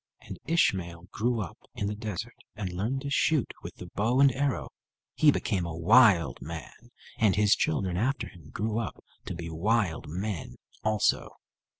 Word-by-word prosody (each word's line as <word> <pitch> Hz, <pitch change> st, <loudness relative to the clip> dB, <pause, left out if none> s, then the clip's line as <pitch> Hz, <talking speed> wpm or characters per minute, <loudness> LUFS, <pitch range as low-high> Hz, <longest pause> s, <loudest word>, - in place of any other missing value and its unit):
And -, -, -9 dB
Ishmael 90 Hz, -, +1 dB
grew 115 Hz, +1 st, 0 dB
up 95 Hz, -, -7 dB, 0.2 s
in 100 Hz, -, -2 dB
the 105 Hz, -, -1 dB
desert 105 Hz, -4 st, -5 dB, 0.2 s
and 95 Hz, -4 st, -4 dB
learned 115 Hz, +9 st, -1 dB
to 140 Hz, 0 st, -4 dB
shoot 150 Hz, -1 st, +2 dB
with -, -, -8 dB
the -, -, -9 dB
bow 115 Hz, +5 st, +1 dB
and 140 Hz, -1 st, +7 dB
arrow. 140 Hz, +1 st, -1 dB, 0.4 s
He 155 Hz, -, +5 dB
became 100 Hz, -9 st, +1 dB
a 85 Hz, -1 st, -4 dB
wild 90 Hz, -, +5 dB
man, 85 Hz, +9 st, -9 dB, 0.3 s
and 105 Hz, -4 st, +4 dB
his 105 Hz, 0 st, +5 dB
children 90 Hz, +3 st, 0 dB
after 130 Hz, +8 st, 0 dB
him 85 Hz, -7 st, -15 dB
grew 110 Hz, +5 st, -2 dB
up 115 Hz, -, -5 dB, 0.2 s
to -, -, -4 dB
be 85 Hz, 0 st, -6 dB
wild 95 Hz, +1 st, 0 dB
men 90 Hz, -, -4 dB, 0.3 s
also. 110 Hz, -1 st, +2 dB
105 Hz, 170 wpm, -28 LUFS, 85-120 Hz, 0.4 s, and